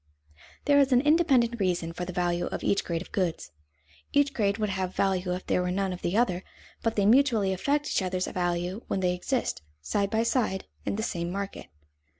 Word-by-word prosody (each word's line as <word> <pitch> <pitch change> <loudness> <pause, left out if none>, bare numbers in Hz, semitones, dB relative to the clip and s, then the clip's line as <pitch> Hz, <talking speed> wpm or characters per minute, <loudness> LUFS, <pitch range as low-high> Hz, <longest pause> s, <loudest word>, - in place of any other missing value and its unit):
There 285 -1 +5
is 275 -1 +3
an 250 -1 +5
independent 270 -6 +3
reason 175 -3 0
for 180 +1 -4
the 180 - -5
value 175 -1 0
of - - -5
each 200 - +2
grade 170 0 -2
of - - -18
goods; 175 - -2 0.6
each 285 -1 +3
grade 200 -4 +1
would 210 -2 -1
have 190 -1 -3
value 185 -2 +1
if 185 - -7
there - - +1
were 180 - -1
none 190 0 -1
of 180 - -8
the 175 +5 0
other, 185 -6 +1 0.4
but 225 -1 0
they 200 - +2
mutually 225 -4 +4
affect 285 +10 0
each - - 0
other's 185 0 -1
value 175 +3 -2
when 190 - -1
they 180 -1 +2
exist, 235 - -2 0.2
side 200 - -1
by 220 +2 +1
side, 230 -5 0 0.2
in - - 0
the 220 - -2
same 170 -6 -2
market. 195 +2 -5
195 Hz, 205 wpm, -28 LUFS, 180-235 Hz, 0.6 s, There